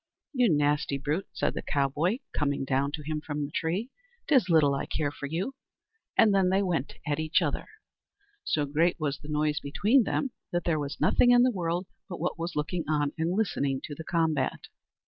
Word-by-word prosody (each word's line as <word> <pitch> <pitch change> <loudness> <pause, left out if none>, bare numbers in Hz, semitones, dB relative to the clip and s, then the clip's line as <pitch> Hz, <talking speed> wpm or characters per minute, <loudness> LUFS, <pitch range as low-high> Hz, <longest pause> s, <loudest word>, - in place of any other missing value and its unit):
"You 250 -6 +3
nasty 145 -1 +1
brute," 150 +7 -2
said - - -1
the - - -4
cowboy, 145 - 0 0.2
coming 140 -2 0
down 135 +1 +1
to 150 -2 -4
him 155 +1 -3
from 150 -1 -3
the 145 - -9
tree, 185 - -2 0.4
"'tis 265 -10 +4
little 155 -4 +5
I 140 - -2
care 145 -2 -1
for 145 - -6
you"; 175 - -2 0.6
and 215 -2 +6
then 190 -2 +3
they 190 +2 +2
went 165 -8 -1
at 150 0 -1
each 155 +2 +2
other. 150 -6 -2 0.8
So 150 - 0
great 160 +5 +1
was 145 -3 -2
the 150 - -12
noise 150 0 +1
between 210 - +3
them 265 +3 -1 0.2
that 175 0 0
there 160 -3 +1
was 145 -1 -4
nothing 245 - +4
in 245 0 +7
the 255 - +4
world 175 -2 -2 0.2
but 175 - -6
what 170 +1 -2
was 170 +2 -3
looking 160 +3 -1
on 145 -2 +1
and 165 +3 -1
listening 140 -11 0
to 150 - -6
the 160 - -7
combat. 160 -5 0
155 Hz, 200 wpm, -28 LUFS, 145-180 Hz, 0.8 s, in